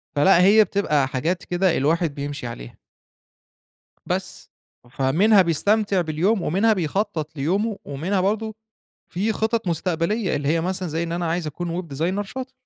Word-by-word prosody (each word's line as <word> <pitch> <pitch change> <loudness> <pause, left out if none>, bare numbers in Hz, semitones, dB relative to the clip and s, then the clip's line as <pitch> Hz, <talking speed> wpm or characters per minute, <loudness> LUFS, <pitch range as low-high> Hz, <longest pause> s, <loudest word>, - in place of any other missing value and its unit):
فلأ، 170 +5 +5
هي 205 +4 +7
بتبقى 150 -10 0
حاجات 160 +8 -2
كده، 180 0 +1
الواحد 155 +2 +1
بيمشي 145 -3 -5
عليها. - - -9 1.3
بس. - - -4 0.4
فمنها 180 - +4
بيستمتع 200 +4 +1
باليوم، 175 +6 0
ومنها 200 +8 +2
بيخطط 165 -3 -2
ليومه، 195 +9 -1
ومنها 170 +8 -1
برضه 215 +3 -1 0.6
في 205 +5 0
خطط 220 -1 -1
مستقبلية 175 +4 -1
اللي 140 -1 -2
هي 165 +2 +2
مثلًا، 185 +1 -2
زي 160 +2 -2
إن 170 0 -3
أنا 175 0 -2
عايز 165 0 -1
أكون 170 +3 -4
web - - -13
designer 180 +7 0
شاطر. 260 +5 -7
175 Hz, 145 wpm, -23 LUFS, 155-200 Hz, 1.3 s, هي